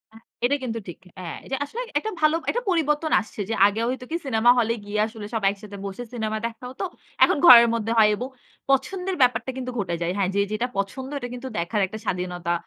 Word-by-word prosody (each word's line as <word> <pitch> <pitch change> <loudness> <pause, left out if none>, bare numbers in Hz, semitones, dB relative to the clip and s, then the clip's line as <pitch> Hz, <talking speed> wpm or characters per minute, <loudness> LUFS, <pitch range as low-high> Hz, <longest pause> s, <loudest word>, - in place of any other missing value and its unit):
আ - - -12 0.3
এটা 280 - +3
কিন্তু 230 -2 -3
ঠিক। 175 - -8 0.2
হ্যাঁ, 180 -3 -6
এটা 270 - -2
আসলে 465 +12 -6 0.2
একটা 440 - -4
ভালো 310 +1 +4
একটা 485 - 0
পরিবর্তন 315 -2 +1
আসছে। 220 - -13
যে 225 - 0
আগে 205 +2 +1
হয়তো 255 0 -3
কি 330 - 0
সিনেমা 240 -3 +3
হলে 230 0 +2
গিয়ে 205 +1 -2
আসলে 220 -2 -9
সব 225 - -1
একসাথে 200 0 -7
বসে 200 +5 -5
সিনেমা 220 -2 -2
দেখা 230 +1 -6
হতো। 260 +8 -6 0.4
এখন - - +4
ঘরের 235 -3 +10
মধ্যে 225 -1 -1
হয় 215 -1 +7
এবং 250 +4 -4 0.4
পছন্দের 360 +8 0
ব্যাপারটা 250 0 +3
কিন্তু 255 -1 -4
ঘটে 175 -3 -1
যায়। 170 - 0
হ্যাঁ, 190 -2 +1
যে - - +2
যেটা 230 +4 -1
পছন্দ 260 +7 -3
এটা 245 - -5
কিন্তু 250 +1 -6
দেখার 175 +5 0
একটা 215 - -7
স্বাধীনতা 180 -1 -2
230 Hz, 215 wpm, -24 LUFS, 205-265 Hz, 0.4 s, ঘরের